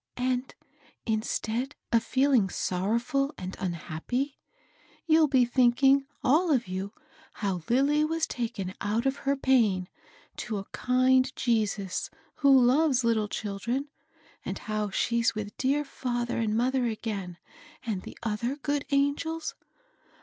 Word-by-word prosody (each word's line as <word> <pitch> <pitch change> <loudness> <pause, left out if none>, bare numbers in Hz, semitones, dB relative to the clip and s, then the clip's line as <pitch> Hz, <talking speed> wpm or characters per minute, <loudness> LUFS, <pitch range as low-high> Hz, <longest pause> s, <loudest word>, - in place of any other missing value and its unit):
And 250 +1 -1 0.5
instead 225 +3 -2 0.2
of 230 -1 +3
feeling 260 -5 +3
sorrow&l 235 - -1
and 185 +1 -6
unhappy, 185 - -3 0.7
you'll 315 -1 +5
be 260 -3 +4
thinking 265 +3 +4 0.2
all 320 +7 +3
of 245 -7 +2
you 190 +2 -4 0.4
how 190 -4 -2
Lilly 280 +5 +3
was 325 +1 0
taken 220 - -4
out 215 +4 0
of 270 0 +1
her 280 - +3
pain 225 -9 +2 0.5
to 215 - -3
a 195 - -5
kind 255 +1 +3
Jesus 210 -5 -1 0.3
who 270 -3 +6
loves 265 0 +3
little 225 -2 +2
children; 225 +8 -3 0.5
and - - -4
how 215 -1 -2
she's 235 +4 +1
with 210 -1 -5
dear 280 +3 +1
&ther 240 -3 -3
and 220 -1 0
mother 255 +1 +1
again 205 -6 -4 0.5
and 210 -5 -2
the - - -10
other 230 +4 -1
good 290 0 -2
angels? 290 +3 0
245 Hz, 130 wpm, -28 LUFS, 210-275 Hz, 0.7 s, who